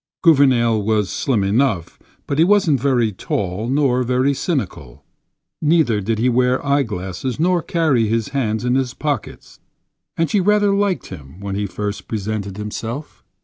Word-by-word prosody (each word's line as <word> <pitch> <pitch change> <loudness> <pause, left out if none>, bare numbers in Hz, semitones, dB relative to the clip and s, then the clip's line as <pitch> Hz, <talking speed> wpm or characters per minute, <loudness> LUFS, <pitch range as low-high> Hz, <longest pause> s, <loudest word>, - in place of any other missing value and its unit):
Gouvernail 130 - +4
was 105 -2 0
slim 115 -7 0
enough, 100 -3 0 0.3
but 140 - -2
he - - +7
wasn't 180 -7 +3
very 125 -5 +2
tall 95 +2 -3
nor 135 -2 +2
very 125 +3 +1
cynical; 105 - -4 0.6
neither 150 -9 +2
did 110 +3 -1
he 120 +3 +1
wear 125 +2 +1
eyeglasses 120 -4 -2
nor 175 +1 +2
carry 155 -10 +1
his 115 0 -1
hands 115 -4 -1
in 125 - +1
his 130 -1 0
pockets. 145 -6 -4 0.6
And 165 - +2
she 195 +6 +1
rather 205 +1 +3
liked 200 -2 0
him 75 -1 -11
when 100 0 -5
he 100 +1 -2
first 105 +1 -5
presented 105 -2 -4
himself. 115 +6 -6
125 Hz, 150 wpm, -19 LUFS, 105-145 Hz, 0.6 s, he